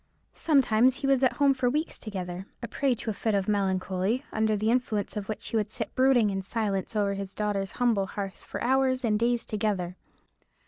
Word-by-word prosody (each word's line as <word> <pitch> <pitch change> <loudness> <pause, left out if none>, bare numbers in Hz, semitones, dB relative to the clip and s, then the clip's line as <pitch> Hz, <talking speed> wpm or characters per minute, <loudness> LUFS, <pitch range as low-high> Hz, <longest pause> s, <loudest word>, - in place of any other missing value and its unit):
Sometimes 260 -5 +3
he 275 - -5
was 270 -1 +3
at 260 - +3
home 280 -1 +4
for 260 -2 +1
weeks 300 +5 -2
together, 185 -3 -5 0.2
a - - -2
prey 270 0 0
to 225 0 -3
a - - -3
fit 215 +1 -1
of 195 -1 0
melancholy; 195 +4 0
under 220 -1 +1
the 215 +2 +1
influence 230 -5 -1
of 205 -1 -5
which 215 - -4
he - - -4
would 210 -1 0
sit 220 0 -3
brooding 255 -5 +4
in 195 0 -2
silence 200 0 -2
over 200 -1 +1
his 195 -1 -6
daughter's 205 -2 -2
humble 225 -6 +1
hearth 195 -1 -6
for - - -6
hours 260 0 +2
and 210 -2 +2
days 240 0 +1
together. 200 -5 -1
215 Hz, 200 wpm, -27 LUFS, 200-250 Hz, 0.2 s, home